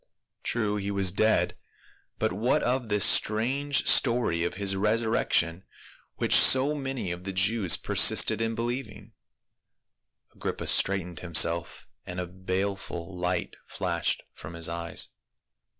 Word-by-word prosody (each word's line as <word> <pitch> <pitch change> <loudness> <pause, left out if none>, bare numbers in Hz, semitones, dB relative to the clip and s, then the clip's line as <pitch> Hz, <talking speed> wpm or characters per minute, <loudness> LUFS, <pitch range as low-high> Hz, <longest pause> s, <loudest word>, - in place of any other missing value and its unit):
True 105 -3 -2
he 100 0 -4
was 100 -2 +1
dead, 110 +3 +1 0.6
but - - -1
what 110 +6 0
of 125 -1 -1
this 105 -2 +2
strange 135 +7 +2
story 115 -9 +3
of 85 - -3
his 95 0 -1
resurrection 105 -5 0 0.5
which - - 0
so 135 +3 +7
many 135 -9 -4
of 90 +1 -7
the 95 - -5
Jews 95 0 +1
persisted - - +3
in 115 0 -2
believing? 120 0 -5 1.2
Agrippa - - -5
straightened 90 -4 +1
himself 85 -1 0 0.2
and 90 0 -7
a 90 - -3
baleful 95 0 -5
light 90 0 -3
flashed - - -2
from 85 - -11
his 85 -1 -2
eyes. 85 0 -3
100 Hz, 125 wpm, -27 LUFS, 90-115 Hz, 1.2 s, so